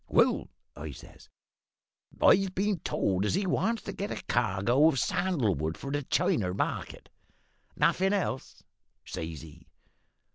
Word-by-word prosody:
"`Well,' - - +3 0.3
I 75 +1 -6
says, - - -14 0.9
`I've 190 -1 +4
been 200 -1 0
told 95 -8 0
as 105 - +1
he 195 +1 0
wants 210 +6 0
to - - -5
get 200 +2 -4
a - - -5
cargo 120 +4 +2
of 160 - +2
sandal 140 - +1
wood 80 +1 -3
for 140 - -6
the 145 0 0
China 95 -8 +1
market.' - - -3 0.7
"`Nothin' 190 +1 +3
else?' 190 -10 -2 0.4
says 80 -2 -5
he. 80 0 -14
135 Hz, 140 wpm, -29 LUFS, -, 0.9 s, `I've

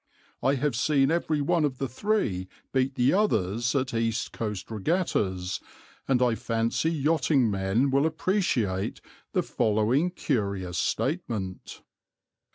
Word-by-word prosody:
I 135 +2 +3
have 140 -1 0
seen 135 +2 +3
every 160 -3 0
one 165 +2 +2
of 135 -4 0
the 135 - -2
three 125 - -1 0.3
beat 130 0 +1
the 125 0 +3
others 120 - +1
at 130 -2 0
East 115 -1 -1
Coast 105 -2 -4
regattas, 100 - -1 0.5
and 125 -2 +3
I 120 -2 +3
fancy 115 +7 0
yachting 145 -6 +2
men 100 +7 +1
will 140 +3 +3
appreciate 155 - 0 0.3
the - - +2
following 110 +10 +1
curious 100 - -2
statement. 110 - -3
125 Hz, 125 wpm, -27 LUFS, 105-150 Hz, 0.5 s, I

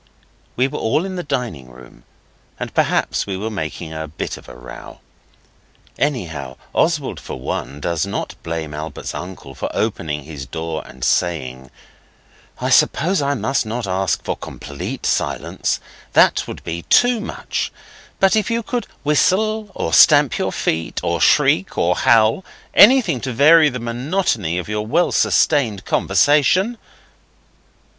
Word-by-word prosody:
We 130 +2 +2
were - - -5
all 150 +10 0
in 190 -1 -5
the 180 - -3
dining 110 - -4
room, - - -16 0.5
and - - -5
perhaps - - +1
we 95 -2 -3
were 110 +3 -4
making 80 -3 -5
a 80 0 -5
bit 75 - -5
of - - -13
a - - -11
row. 60 +1 -11 1.0
Anyhow, 80 - -3 0.2
Oswald 150 -4 0
for - - -8
one, 70 +2 -4
does 85 +1 -1
not 100 - -4
blame 80 -2 -4
Albert's 75 +2 -6
uncle 90 -7 -8
for - - -4
opening 80 -9 -2
his 70 -3 -8
door 80 +3 -4
and 65 -1 -11
saying 65 -5 -1 0.9
'I - - -1
suppose 180 +3 +3
I 140 0 0
must 130 +3 0
not 115 +1 -4
ask 95 -2 -1
for - - -2
complete 70 -1 -7
silence. 70 -4 -1 0.3
That - - +4
were - - -5 0.3
too 245 -1 +4
much. 220 - -4 0.5
But 195 +2 +4
if 215 -1 +1
you 230 0 -1
could 240 +2 -3 0.2
whistle, 210 +8 +1
or 80 - -2
stamp - - +7
with - - -3
your - - -1
feet, 80 +1 -2
or 85 -1 -1
shriek 90 +5 +3
or 90 +1 +2
howl 115 +5 +3 0.3
anything 205 - +6
to 130 - -3
vary 150 +5 +6
the 125 - -5
monotony 120 - -1
of 90 - -4
your 105 0 -3
well 170 +9 +2
sustained 120 -10 +2
conversation. 185 - +2
110 Hz, 150 wpm, -19 LUFS, -, 1.0 s, stamp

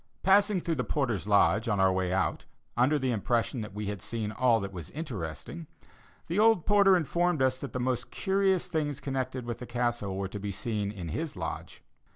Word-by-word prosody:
Passing 200 0 +4
through 165 - -1
the - - -2
porter's 120 - -1
lodge 105 +2 +4
on 105 -3 +1
our 95 -1 +4
way 95 -1 0
out, 95 +1 0 0.3
under 130 +5 +3
the 130 -3 0
impression 120 +2 0
that 105 -2 -7
we 105 0 -3
had 100 -2 -4
seen 110 -2 -3
all 120 0 +3
that 100 0 -5
was 85 -5 -7
interesting, 140 - -6 0.6
the 175 +5 -1
old 220 -6 +5
porter 200 -2 +6
informed 170 -2 +1
us 130 0 +1
that 140 - -6
the 125 - -3
most 125 0 -1
curious 190 -1 +1
things 145 -3 -2
connected 130 -2 -3
with 120 -1 -4
the 125 - -7
Castle 120 -5 -1
were 100 0 -2
to 105 +2 -7
be 100 0 -4
seen 100 0 -2
in 90 -5 -6
his - - -3
lodge. - - -6
125 Hz, 200 wpm, -29 LUFS, 105-155 Hz, 0.6 s, porter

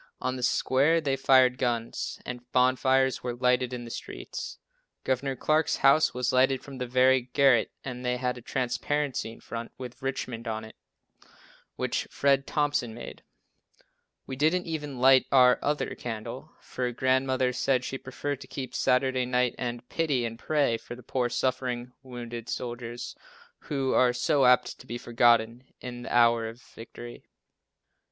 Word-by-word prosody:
On 130 - -2
the 125 - -6
square 135 +6 +3
they 140 -4 0
fired 130 -1 +4
guns, 120 -2 -2
and 125 0 -8
bonfires 130 +1 +3
were 120 -1 -3
lighted 125 0 +1
in 120 -1 -5
the 115 - -8
streets. - - -7 0.5
Gov. 130 0 -1
Clark's 155 +3 +2
house 140 +3 +5
was 125 0 -1
lighted 130 +1 +3
from 135 -2 -9
the 125 - -3
very 130 0 +3
garret 135 -4 +4
and 125 -1 -6
they 125 0 0
had 125 0 -1
a 125 - -10
transparency 130 +1 -2
in - - -14
front, 115 0 -6
with 125 +1 -9
"Richmond" 125 -3 -4
on 110 -1 -3
it, 110 - -12 1.0
which - - -2
Fred 140 -1 +2
Thompson 145 -6 0
made. 120 - -9 1.0
We 130 - -5
didn't 160 +6 +2
even 150 -4 -4
light 130 +1 +5
"our 125 -2 +6
other 145 +1 -1
candle," 110 -3 -6
for 125 -1 -3
Grandmother 130 +1 +1
said 130 0 +1
she 135 - -4
preferred 140 +1 -5
to - - -10
keep 130 -2 -6
Saturday 130 -1 +1
night 125 -1 +1
and 120 -1 -4
pity 145 -7 0
and 115 0 -6
pray 145 -7 +1
for 120 - -9
the 125 - -14
poor 125 +1 -1
suffering, 125 -1 -2
wounded 120 -3 -8
soldiers, 120 -1 -5 0.4
who 135 -3 -2
are 125 -1 +4
so 135 +2 +2
apt 125 0 +3
to 125 - -14
be 120 - -4
forgotten 120 0 +2 0.2
in 120 -1 -7
the - - -7
hour 115 -1 +4
of 115 +2 -11
victory. 120 0 -11
125 Hz, 160 wpm, -28 LUFS, 120-135 Hz, 1.0 s, our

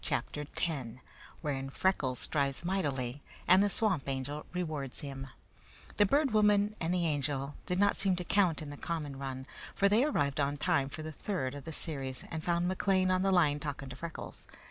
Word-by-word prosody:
CHAPTER 150 - -2
X 150 -8 -1 0.5
Wherein 135 -3 -2
Freckles 135 -5 +1
Strives 140 +3 -1
Mightily 145 -8 -1 0.3
and 185 +2 +7
the 205 - +3
Swamp 190 -10 +1
Angel 135 +3 -3
Rewards 155 -7 -3
Him 135 -1 -6 0.7
The 205 - +5
Bird 280 +3 +3
Woman 210 -1 +4
and 165 0 0
the 180 -1 +2
Angel 145 -2 0
did 180 - 0
not 200 +1 +4
seem 195 -2 +2
to 180 - -2
count 175 -4 +2
in 145 - -7
the 145 - -8
common 150 -5 -4
run, 130 -1 -5 0.3
for 200 - +4
they 215 +5 +4
arrived 145 - +1
on 140 0 +1
time 140 -1 +2
for 155 - -7
the 155 - -5
third 145 -5 -2
of 145 0 -8
the 160 - -5
series 135 -5 -3
and 160 -1 -4
found 175 +1 +1
McLean 185 0 +2
on 185 0 +3
the 195 0 +3
line 150 -6 +4
talking 145 -2 -5
to - - -7
Freckles. 170 -1 -7
155 Hz, 190 wpm, -32 LUFS, 140-185 Hz, 0.7 s, and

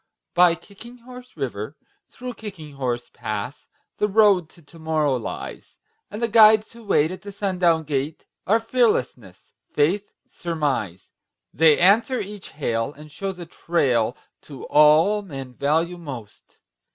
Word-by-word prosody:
By 175 -1 +5
Kicking 220 +7 -13
Horse 250 -2 -13
River, 130 -1 -4 0.3
through 250 0 -7
Kicking 190 -10 -9
Horse 125 -3 -3
Pass, 115 +4 -5 0.3
The 210 - +1
Road 200 -5 +4
to 170 - -20
Tomorrow 155 -2 -1
lies; 115 - -7 0.3
And 215 +3 -6
the - - +3
guides 215 -1 +6
who 235 0 -14
wait 165 -6 +2
at 185 - -8
the 200 - -8
sundown 180 -5 +1
gate 145 +1 -3 0.2
Are 220 +4 +4
Fearlessness, 215 - -1 0.2
Faith, 180 +8 +1 0.2
Surmise. 140 - -3 0.4
They 160 -2 +5
answer 225 +8 +4
each 205 0 -7
hail 115 -4 -2
and 150 +1 -14
show 195 +6 -4
the 180 -2 -9
trail 130 -9 0 0.2
To 140 -4 -11
all 155 +8 +5
men 135 -9 -8
value 160 +7 0
most. 130 -10 -10
165 Hz, 140 wpm, -23 LUFS, 140-205 Hz, 0.4 s, guides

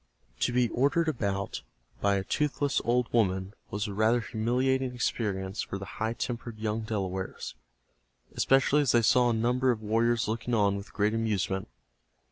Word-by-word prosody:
To - - +1
be 125 0 +3
ordered 145 +8 +2
about 100 -9 -2 0.4
by 100 0 +3
a 95 - -1
toothless 145 +3 0
old 120 0 +1
woman 95 -4 +1 0.2
was 105 +1 -2
a 100 - -5
rather 110 +4 +3
humiliating 125 +3 0
experience 100 -4 -2
for 100 - -4
the 95 - -7 0.2
high 110 +1 +1
tempered 120 -1 -4
young 110 0 -2
Delawares, 95 -4 -4 0.8
especially 135 +2 +3
as 140 -5 +2
they 120 -1 +4
saw 125 +2 +4
a - - +2
number 125 +3 +1
of 110 -3 0
warriors 115 +2 +2
looking 115 +2 -1
on 100 -2 +3
with 100 +2 -7
great 105 0 +1
amusement. 100 -4 -1
115 Hz, 160 wpm, -29 LUFS, 100-125 Hz, 0.8 s, they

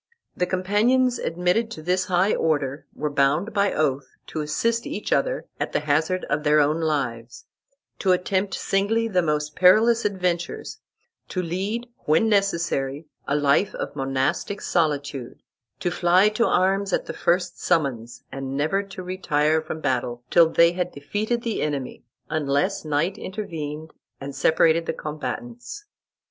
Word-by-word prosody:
The 180 - 0
companions 230 +7 +2
admitted 180 +7 0
to 155 -9 -8
this 180 +2 +1
high 185 +2 +2
order 145 -3 -1
were 150 0 -2
bound 145 +8 +1
by 200 -1 +2
oath 145 -3 -1
to 155 - -4
assist 230 - -1
each 300 - -2
other - - 0
at - - -3
the - - +1
hazard 155 +5 0
of 150 - -1
their 150 0 +4
own 150 +3 +2
lives, 125 -7 -2 0.5
to 190 - +2
attempt 190 +2 0
singly 220 +4 0
the 185 -5 +2
most 150 -2 -1
perilous 225 +6 +5
adventures, 180 -4 -2 0.5
to 185 - -2
lead, 195 +8 -3 0.2
when 160 +9 +3
necessary, 170 -8 0 0.2
a 140 - +1
life 145 +6 +2
of - - -5
monastic 135 +9 -1
solitude, 145 -6 -2 0.4
to 175 - 0
fly 180 +4 +4
to 215 +2 +1
arms 195 +1 +2
at - - 0
the - - -5
first 175 +1 0
summons, 125 -8 -1
and 135 0 -4
never 155 +7 +1
to 195 -2 -9
retire 160 -4 +1
from 155 0 -6
battle 120 -2 -1
till 170 -2 +6
they 170 +1 +5
had 180 0 -2
defeated 210 +12 -2
the 230 -2 -2
enemy, 140 -4 -3 0.2
unless 155 +6 0
night 160 +7 -1
intervened 160 -6 -6 0.3
and 140 0 -7
separated 165 +1 +3
the - - 0
combatants. 245 - -6
170 Hz, 150 wpm, -24 LUFS, 150-195 Hz, 0.5 s, till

